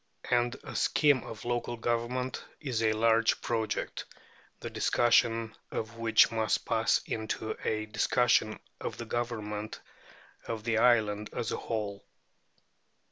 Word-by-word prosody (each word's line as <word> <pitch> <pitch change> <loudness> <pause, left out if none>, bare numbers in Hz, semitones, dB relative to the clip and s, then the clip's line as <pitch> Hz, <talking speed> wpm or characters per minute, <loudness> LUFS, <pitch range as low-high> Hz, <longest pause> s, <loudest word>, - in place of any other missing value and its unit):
And 120 0 +2
a - - -8
scheme 145 -5 +3
of 110 - -8
local 120 0 -2
government 120 +2 -2 0.2
is 130 -7 -2
a 110 -1 +3
large 115 +1 +3
project, 115 -2 -2 0.5
the - - -6
discussion 115 -1 +2
of 110 +1 -5
which 115 -1 +5
must 110 -1 0
pass 110 -2 +2
into 110 0 -3
a 110 0 -1
discussion 110 0 +2 0.2
of - - -5
the 120 - -6
government 110 -3 -3 0.7
of 115 -2 -4
the 115 -1 +1
island 105 -3 +3
as 115 - -2
a - - -1
whole. 105 -3 -4
115 Hz, 130 wpm, -30 LUFS, 110-120 Hz, 0.7 s, which